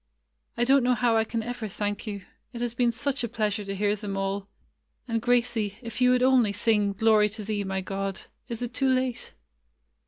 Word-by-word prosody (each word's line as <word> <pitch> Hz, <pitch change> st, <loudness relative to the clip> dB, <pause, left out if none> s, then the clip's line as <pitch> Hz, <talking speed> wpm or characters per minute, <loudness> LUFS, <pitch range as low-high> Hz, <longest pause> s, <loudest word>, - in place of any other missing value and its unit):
"I 240 Hz, -, +2 dB
don't 270 Hz, +2 st, +5 dB
know 250 Hz, 0 st, +3 dB
how 240 Hz, -2 st, +2 dB
I 220 Hz, -, +4 dB
can 225 Hz, 0 st, -3 dB
ever 240 Hz, -1 st, -4 dB
thank 205 Hz, +1 st, -3 dB
you. 200 Hz, -2 st, -5 dB, 0.3 s
It 235 Hz, -, -6 dB
has 240 Hz, -1 st, -1 dB
been 240 Hz, 0 st, +2 dB
such 275 Hz, +3 st, -2 dB
a 235 Hz, -, -2 dB
pleasure 215 Hz, -1 st, -1 dB
to 195 Hz, 0 st, -4 dB
hear 205 Hz, +1 st, +1 dB
them 200 Hz, -2 st, -5 dB
all. 195 Hz, 0 st, -2 dB, 0.6 s
And 230 Hz, -2 st, -1 dB
Gracie, 235 Hz, -4 st, +1 dB
if 230 Hz, +2 st, -6 dB
you 250 Hz, -, +6 dB
would 250 Hz, 0 st, +3 dB
only 255 Hz, -5 st, +4 dB
sing 205 Hz, -1 st, +2 dB
'Glory 215 Hz, 0 st, +4 dB
to 215 Hz, +1 st, -7 dB
Thee, 205 Hz, 0 st, -2 dB
my 190 Hz, 0 st, -2 dB
God.' 195 Hz, 0 st, -4 dB, 0.3 s
Is 235 Hz, 0 st, -4 dB
it 245 Hz, 0 st, -4 dB
too 270 Hz, -1 st, +2 dB
late?" 255 Hz, -2 st, -1 dB
225 Hz, 210 wpm, -27 LUFS, 205-245 Hz, 0.6 s, you